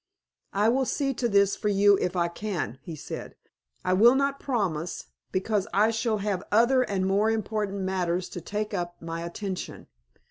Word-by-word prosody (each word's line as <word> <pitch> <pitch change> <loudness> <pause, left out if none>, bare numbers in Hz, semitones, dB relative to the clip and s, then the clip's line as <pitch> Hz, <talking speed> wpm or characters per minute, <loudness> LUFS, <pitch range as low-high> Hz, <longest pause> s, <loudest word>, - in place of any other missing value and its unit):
"I 205 +2 +3
will 260 +3 +3
see 275 +1 0
to 240 -1 -1
this 200 -1 +4
for 210 - -1
you 200 0 +5
if 180 0 -1
I 170 -1 +2
can," 170 - -4
he 165 - -7
said. 150 - -7 0.5
"I 185 - +2
will 235 +7 +6
not 275 0 +1
promise, 180 - -2 0.3
because 195 +1 0
I 215 +3 +4
shall 225 -1 0
have 200 -3 -1
other 240 +4 +5
and 195 -6 0
more 200 +3 +2
important 210 -2 -1
matters 185 -1 -1
to 175 - -7
take 210 +5 -3
up 175 -2 -3
my 165 0 -5
attention. 185 +2 -5
200 Hz, 175 wpm, -27 LUFS, 180-220 Hz, 0.5 s, will